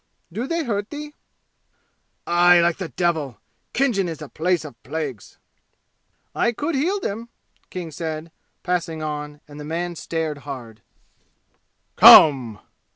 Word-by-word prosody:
"Do 235 +7 -3
they 335 +1 -1
hurt 205 -5 -3
thee?" 295 0 -8 1.1
"Aye, 175 0 +5
like 170 0 +2
the 185 -4 -5
devil! 160 -9 -1 0.4
Khinjan 225 -9 +1
is 160 -3 -6
a 150 - -8
place 175 +1 -1
of 120 -6 -12
plagues!" 145 -9 -6 1.0
"I 240 - +1
could 295 +8 -3
heal 345 +9 0
them," 230 - -5 0.4
King 175 -3 -6
said, 160 +1 -5 0.3
passing 170 -3 -2
on, 150 -1 -5
and 145 0 -12
the - - -7
man 170 +3 -4
stared 160 -2 -4
hard. 120 -7 -9 1.2
"Come!" 125 -8 +8
165 Hz, 130 wpm, -22 LUFS, 150-200 Hz, 1.2 s, Come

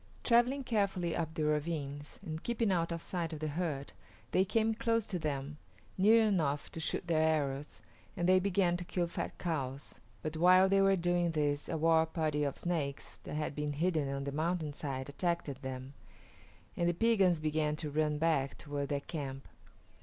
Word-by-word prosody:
Travelling 245 +3 +3
carefully 200 -7 0
up 160 -1 -3
the 155 - -1
ravines, 150 -1 -2
and 160 -2 -5
keeping 230 -3 0
out 170 -2 +1
of 170 0 -4
sight 170 -3 -3
of 155 - -5
the 155 0 -2
herd, 150 -3 -3 0.4
they 185 - +4
came 225 +3 +1
close 230 -1 0
to 185 -4 -3
them, 150 -1 -3 0.4
near 220 +4 +6
enough 155 -9 0
to - - -6
shoot 160 - -2
their 165 -2 +2
arrows, 145 -3 0 0.4
and 175 - +1
they 185 0 +6
began 185 -2 +2
to 175 - -5
kill 175 0 -1
fat 170 - -5
cows. 140 -5 -4 0.2
But 155 0 -3
while 185 +3 +6
they 195 0 +4
were 195 0 +5
doing 175 -1 +1
this 145 -2 0
a - - -1
war 160 0 +4
party 155 -2 -1
of 140 -2 -2
Snakes 155 -6 -3
that - - -5
had 150 -1 -2
been 150 0 -2
hidden 155 -2 0
on 140 0 -3
the 140 - -3
mountainside 150 -4 -2
attacked 145 -2 -2
them, 130 0 -6 0.8
and 170 0 +1
the 175 - 0
Piegans 195 -5 +3
began 155 -1 0
to 150 -1 -4
run 150 0 +1
back 150 -4 +1
toward 145 -1 -4
their 140 -1 -1
camp. 135 -4 -6
160 Hz, 185 wpm, -33 LUFS, 145-180 Hz, 0.8 s, near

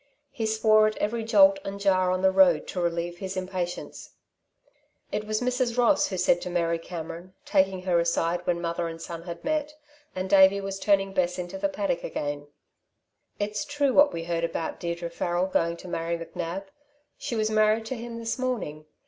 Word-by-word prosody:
He 225 -2 -2
swore 215 0 +4
at 215 - -3
every 225 +2 -1
jolt 195 -3 +5
and 195 0 -5
jar 185 -2 +3
on 185 0 0
the 190 - +5
road 185 -5 +5
to 180 - -3
relieve 170 0 -2
his 190 0 -5
impatience. 185 -1 -4 1.0
It 210 - -2
was 215 +1 -1
Mrs. 250 -1 0
Ross 245 +4 +4
who 190 - -4
said 175 -1 +3
to - - -4
Mary 170 -1 0
Cameron, 170 +2 -8
taking 190 -2 +1
her 180 -2 +2
aside 170 0 0
when 175 -1 +1
mother 170 0 -2
and 165 0 -7
son 165 0 -7
had 170 0 -8
met, 300 0 -1 0.4
and 185 0 -2
Davey 190 +1 +6
was 195 0 -5
turning 195 -1 +2
Bess 180 -2 0
into 180 +1 -5
the 200 0 +1
paddock 195 -3 -2
again: 145 -2 -4 0.9
"It's 210 0 -2
true 285 -2 0
what 285 +2 +6
we 165 - -4
heard 170 0 -2
about 165 -1 -3
Deirdre 170 0 -4
Farrel 175 +1 0
going 170 -3 0
to 185 - -11
marry 170 0 -2
McNab. 170 +3 -5 0.6
She 240 - -3
was 215 -1 0
married 215 +1 +3
to 260 - -4
him 235 0 -7
this 230 +2 -3
morning. 195 -13 -3
185 Hz, 190 wpm, -26 LUFS, 170-215 Hz, 1.0 s, Davey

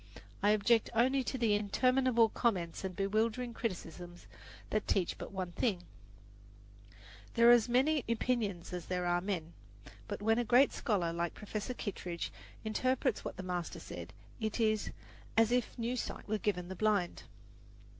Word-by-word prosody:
I 205 - +4
object 215 +2 +3
only 260 +3 +3
to 265 - -2
the 230 -4 +2
interminable 235 +3 +3
comments 190 -9 -1
and 190 -2 -4
bewildering 220 +5 0
criticisms 175 -5 -5 0.5
that 215 - 0
teach 185 -4 +1
but - - -6
one 185 -2 -4
thing: 185 -2 0 1.5
there 235 0 +7
are - - +10
as 240 0 +4
many 270 +4 +3
opinions 220 -7 -1
as 180 -2 -5
there 180 -1 -1
are 175 0 +2
men. 175 -4 -3 0.5
But - - -4
when 225 +2 +3
a - - +2
great 250 +4 +5
scholar 180 -7 0
like 170 0 -2
Professor 215 +3 -4
Kittredge 180 -6 -4 0.3
interprets 255 +3 0
what - - -6
the 185 - -5
master 180 -2 -3
said, - - -8 0.3
it 220 0 -2
is 215 -2 +2 0.5
"as 225 0 +5
if 245 0 0
new 235 +1 -1
sight 250 - -5
were 215 0 0
given 180 -4 -1
the 190 - -5
blind." 205 -3 +1
215 Hz, 155 wpm, -33 LUFS, 185-240 Hz, 1.5 s, are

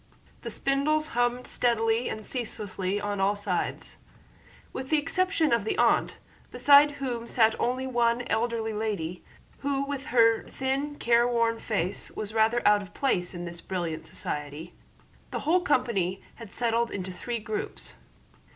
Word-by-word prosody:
The - - -5
spindles 305 +3 +1
hummed 245 +1 0
steadily 230 0 +1
and 215 -1 -6
ceaselessly 205 -5 -3
on 205 -1 -3
all 200 +2 +3
sides. 205 - -3 0.8
With 260 0 -5
the 310 - +4
exception 330 0 +1
of 235 -3 +2
the 220 - -2
aunt, - - +2 0.3
beside 290 +1 +6
whom 250 -4 -4
sat 225 -2 +4
only 255 +2 0
one 240 -1 +1
elderly 225 -1 -1
lady, 200 -6 -3 0.4
who 275 -1 -1
with 280 -1 -4
her 230 -2 +3
thin 275 +2 -2
careworn 235 -2 +2
face 195 -3 -2
was 215 0 -6
rather 225 +1 +3
out 210 0 +5
of 195 - -12
place 180 -10 0
in 175 0 -5
this 170 0 -7
brilliant 175 -4 -4
society, 150 +3 -5 0.6
the - - -4
whole 350 +4 +3
company 195 - 0
had 230 -4 -10
settled 235 0 0
into 185 -1 -5
three 235 +6 -4
groups. 220 -1 -5
230 Hz, 145 wpm, -27 LUFS, 205-260 Hz, 0.8 s, beside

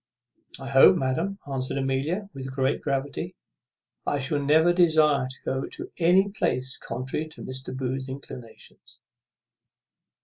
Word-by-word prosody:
"I 135 - -7
hope, 135 0 +7
madam," 160 +10 -1
answered 135 -1 -2
Amelia 140 +9 -1
with 135 -1 -6
great 135 +1 0
gravity, 140 -1 -2 0.7
"I 145 - 0
shall 145 +2 -1
never 160 +4 +5
desire 155 -6 +4
to 130 - -10
go 130 0 -1
to 360 +4 -7
any 180 +4 +4
place 130 -10 -1
contrary 130 +5 -4
to 155 - -10
Mr. 130 0 -5
Booth's 130 0 -3
inclinations." 125 -4 -10
135 Hz, 130 wpm, -26 LUFS, 130-160 Hz, 0.7 s, hope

